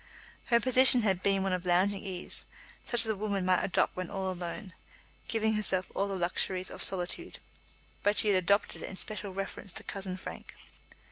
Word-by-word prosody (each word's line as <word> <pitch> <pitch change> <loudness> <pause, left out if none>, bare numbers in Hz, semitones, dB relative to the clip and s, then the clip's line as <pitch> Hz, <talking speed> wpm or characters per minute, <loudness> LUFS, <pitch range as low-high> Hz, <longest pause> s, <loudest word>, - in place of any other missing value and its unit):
Her 235 -1 +3
position 255 +1 +7
had 190 -4 +1
been 195 0 +1
one 195 -1 0
of 180 -1 -2
lounging 185 +3 +1
ease, 185 -2 -3 0.4
such 240 -1 +1
as - - +4
a 220 -1 0
woman 200 -2 -2
might 185 -1 +2
adopt 185 - 0
when 185 -1 -5
all 190 -1 -3
alone, 180 +2 -7 0.5
giving 220 -1 0
herself 190 -4 -1
all 200 - -1
the 195 - -4
luxuries 185 +1 -1
of - - -4
solitude; 190 - +1 0.6
but 205 +1 +1
she 215 - +6
had 195 - +4
adopted 200 +3 +1
it - - -6
in - - -8
special 210 0 -5
reference 195 0 -6
to - - -5
cousin 190 -2 -5
Frank. - - -9
195 Hz, 190 wpm, -30 LUFS, 185-210 Hz, 0.6 s, position